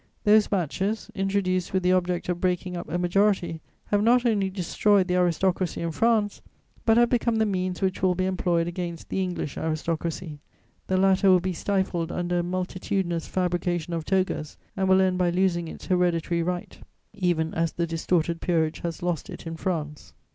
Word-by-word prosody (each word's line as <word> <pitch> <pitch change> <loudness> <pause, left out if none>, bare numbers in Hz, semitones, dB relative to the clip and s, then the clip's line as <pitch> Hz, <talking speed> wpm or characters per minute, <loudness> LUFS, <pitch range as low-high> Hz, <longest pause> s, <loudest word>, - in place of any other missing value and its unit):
Those 210 0 +5
batches, 195 +3 -2
introduced 190 -2 -1
with 190 -1 +1
the 180 - +3
object 180 -1 0
of 180 -1 -2
breaking 180 0 -1
up 175 - -6
a 175 - -1
majority, 175 -2 +1 0.3
have 205 -1 +2
not 240 +3 +4
only 205 -5 +2
destroyed 190 +1 +2
the 180 - 0
aristocracy 180 0 +1
in 170 0 -2
France, 215 +2 +1 0.5
but 225 0 +5
have 240 0 +4
become 235 -2 +2
the 220 0 +2
means 185 -2 -2
which 190 -1 0
will 185 -1 +3
be 185 +1 0
employed 175 -3 0
against 175 -1 -5
the 190 - -1
English 180 -5 -3
aristocracy; 160 0 -3 0.5
the 190 - +1
latter 190 +1 +4
will 185 -1 +6
be 185 +1 -2
stifled 175 -2 -1
under 175 0 -1
a - - 0
multitudinous 180 -1 -2
fabrication 175 -2 -1
of 165 -1 -2
togas 185 -4 -1 0.2
and 190 -1 0
will 190 0 +6
end 185 -1 +1
by 180 -1 +3
losing 175 -1 +1
its - - -9
hereditary 175 -2 +1
right, 175 +1 -4 0.3
even 175 -5 0
as 165 0 0
the 170 - -1
distorted 165 0 0
peerage 160 -3 0
has 170 0 -5
lost 175 -4 -2
it - - -9
in 165 0 -5
France. 155 -4 -4
180 Hz, 180 wpm, -26 LUFS, 170-190 Hz, 0.5 s, will